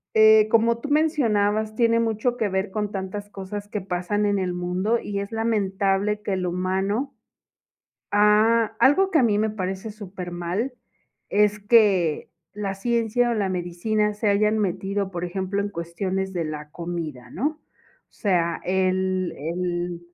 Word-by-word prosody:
eh, 220 0 +7
como 230 +1 +3
tú 260 - -6
mencionabas, 220 -9 +1
tiene 230 0 +3
mucho 230 +2 0
que 225 -4 +1
ver 190 +1 -1
con 210 +1 -2
tantas 200 +1 -5
cosas 200 +1 -7
que 210 0 -4
pasan 190 +3 -1
en 205 -1 +1
el 185 -1 -1
mundo, 180 +6 0
y 200 -2 -4
es 200 +2 -5
lamentable 205 -2 0
que 205 -1 -2
el 185 -1 -1
humano, 190 +8 -1 1.0
ha 210 +3 +4 0.2
algo 290 +10 +5
que 335 - +3
a - - +4
mí 215 -4 +3
me 215 +1 +1
parece 195 +1 -4
súper 195 -4 -8
mal, 175 +9 -2 0.6
es 210 0 +2
que 200 -7 +3 0.2
la 200 -2 -3
ciencia 235 +3 +1
o - - +1
la 200 -3 0
medicina 185 +4 -1
se 210 +1 -1
hayan 210 +2 +2
metido, 195 0 -1
por 175 -2 -4
ejemplo, 190 +2 -2
en 200 - -1
cuestiones 190 +3 -3
de 175 -3 -2
la 150 -1 -6
comida, 165 -8 -6
¿no?, 300 - -2 0.5
o - - -41
sea, 175 -5 0
el 185 0 0
el 175 +2 -3
200 Hz, 160 wpm, -24 LUFS, 185-220 Hz, 1.0 s, eh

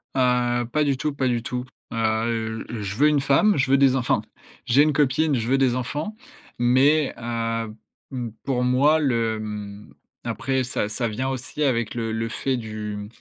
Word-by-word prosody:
Heu, 125 -1 +2
pas 150 - +2
du 140 -2 +1
tout, 150 +2 -2
pas 135 -2 0
du 120 -2 0
tout. 125 0 -4 0.3
Heu, 110 0 -1
je 105 -4 -4
veux 145 +7 +4
une 150 - +3
femme, 145 +9 +3
je 130 - +1
veux 135 - +5
des 135 -1 +4
enf 125 -2 -2
enfin, - - +3 0.4
j'ai 125 +3 +4
une 150 0 +3
copine, 145 +1 +2
je 115 -2 -2
veux 135 +2 +3
des 130 -3 +3
enfants 145 - -3 0.4
mais, 135 +5 +3
heu, 115 -1 -3 0.4
m 120 -3 -4
pour 125 -2 0
moi 135 +5 +4
le, 115 -6 +1
hem, 105 -1 -7 0.3
après 130 0 -1
ça 120 -4 -2
ça 120 +3 -1
vient 125 +5 -2
aussi 135 +3 -5
avec 120 -5 0
le 115 -2 -2
le 115 +1 -2
fait 130 +2 -1
du 105 -2 -5
125 Hz, 185 wpm, -24 LUFS, 115-135 Hz, 0.4 s, veux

